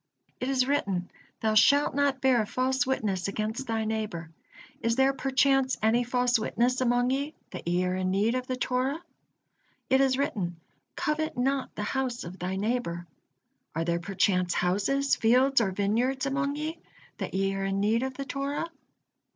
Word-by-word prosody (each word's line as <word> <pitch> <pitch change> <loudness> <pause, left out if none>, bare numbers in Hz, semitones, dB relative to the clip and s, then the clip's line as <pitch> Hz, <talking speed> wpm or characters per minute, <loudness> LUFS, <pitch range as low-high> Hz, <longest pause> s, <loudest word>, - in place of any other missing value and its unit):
It 250 - -2
is 260 -2 +2
written: 195 -11 -1 0.3
'Thou 220 -1 +2
shalt 285 +7 +5
not 280 -2 +1
bear 255 -4 +4
false 260 +2 0
witness 200 -8 -1
against 220 +6 -3
thy 225 -1 -1
neighbor.' 215 -7 -3 0.5
Is 230 0 +1
there 265 +1 +3
perchance 270 0 +2
any 225 +3 +3
false 245 -1 +2
witness 245 +3 0
among 245 0 +2
ye, 280 +3 -2 0.2
that 180 - -8
ye 175 +1 +1
are 180 0 0
in 185 0 -1
need 205 +5 +2
of 255 0 -2
the 255 - -1
Torah? 255 +4 -1 0.9
It 265 +1 +5
is 265 -1 +3
written: 180 -11 -2 0.4
'Covet 310 -1 -1
not 265 +2 0
the 210 - -3
house 255 +1 -2
of 180 +3 -9
thy 185 +2 -2
neighbor.' 200 -5 -2 0.7
Are 165 +1 -1
there 170 0 0
perchance 180 -1 +1
houses, 205 +10 +1
fields, 255 +3 +4
or 205 - +1
vineyards 230 +8 0
among 280 +1 -1
ye, 310 +2 -4 0.4
that - - -4
ye 195 0 +1
are 195 0 -2
in 195 0 -1
need 215 +3 +2
of 265 0 -3
the 275 - -5
Torah?" 280 +4 -3
245 Hz, 170 wpm, -28 LUFS, 195-270 Hz, 0.9 s, shalt